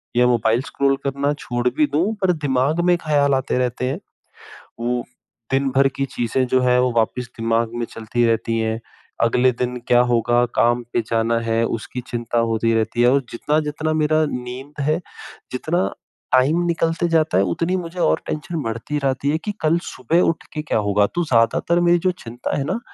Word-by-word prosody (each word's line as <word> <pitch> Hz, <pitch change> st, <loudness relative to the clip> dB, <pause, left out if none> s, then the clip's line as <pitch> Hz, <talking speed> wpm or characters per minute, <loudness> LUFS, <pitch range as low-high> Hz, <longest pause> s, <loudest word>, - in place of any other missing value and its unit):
या 125 Hz, 0 st, +4 dB
mobile 115 Hz, 0 st, +2 dB
scroll 140 Hz, 0 st, +2 dB
करना 140 Hz, +1 st, 0 dB
छोड़ 120 Hz, 0 st, -2 dB
भी 150 Hz, -, +5 dB
दूँ 185 Hz, +9 st, +1 dB
पर 185 Hz, -1 st, +3 dB
दिमाग 145 Hz, +1 st, 0 dB
में 175 Hz, -, +4 dB
ख़्याल 145 Hz, -2 st, +3 dB
आते 130 Hz, -1 st, -1 dB
रहते 125 Hz, 0 st, -1 dB
हैं 150 Hz, +8 st, -3 dB, 0.8 s
वो 120 Hz, +1 st, -1 dB, 0.5 s
दिन 135 Hz, 0 st, +2 dB
भर 135 Hz, +1 st, +4 dB
की 135 Hz, -, -1 dB
चीज़ें 125 Hz, 0 st, -1 dB
जो 130 Hz, -, +2 dB
हैं 125 Hz, 0 st, +3 dB
वो 125 Hz, -1 st, +2 dB
वापस 125 Hz, +2 st, 0 dB
दिमाग 115 Hz, 0 st, 0 dB
में 120 Hz, -1 st, -2 dB
चलती 115 Hz, +2 st, -1 dB
रहती 115 Hz, 0 st, +1 dB
हैं। 110 Hz, 0 st, -1 dB, 0.4 s
अगले 125 Hz, +2 st, +3 dB
दिन 125 Hz, 0 st, -1 dB
क्या 120 Hz, -, +5 dB
होगा 120 Hz, +1 st, +3 dB
काम 120 Hz, +1 st, +3 dB
पे 120 Hz, -, +2 dB
जाना 115 Hz, 0 st, +1 dB
है 115 Hz, 0 st, 0 dB
उसकी 125 Hz, +3 st, -7 dB
चिंता 120 Hz, 0 st, -3 dB
होती 115 Hz, +1 st, +1 dB
रहती 115 Hz, +2 st, 0 dB
है 120 Hz, +1 st, +5 dB
और 140 Hz, 0 st, +3 dB
जितना-जितना 150 Hz, +4 st, -1 dB
मेरा 155 Hz, 0 st, +2 dB
नींद 130 Hz, +4 st, -6 dB
है 155 Hz, +2 st, +2 dB, 0.6 s
जितना 170 Hz, +8 st, 0 dB, 0.5 s
टाइम 140 Hz, +7 st, +4 dB
निकलते 165 Hz, 0 st, 0 dB
जाता 160 Hz, -, +2 dB
है 95 Hz, -, +4 dB
उतनी 170 Hz, -, -1 dB
मुझे 175 Hz, +2 st, -8 dB
और -, -, +2 dB
टेंशन 155 Hz, +1 st, -3 dB
बढ़ती 115 Hz, +6 st, -3 dB
रहती 135 Hz, +1 st, 0 dB
है। 155 Hz, -, +1 dB
कि 210 Hz, -, -1 dB
कल 160 Hz, +2 st, +3 dB
सुबह 160 Hz, +8 st, +1 dB
उठ 165 Hz, -, -3 dB
के 155 Hz, -, -3 dB
क्या 150 Hz, -, -1 dB
होगा 100 Hz, 0 st, +3 dB
तो 175 Hz, -, +1 dB
ज़्यादातर 125 Hz, +8 st, +2 dB
मेरी 175 Hz, 0 st, +4 dB
जो -, -, +4 dB
चिंता 120 Hz, +4 st, -4 dB
है 140 Hz, -, 0 dB
ना, 225 Hz, -, -2 dB
130 Hz, 190 wpm, -21 LUFS, 120-155 Hz, 0.8 s, भी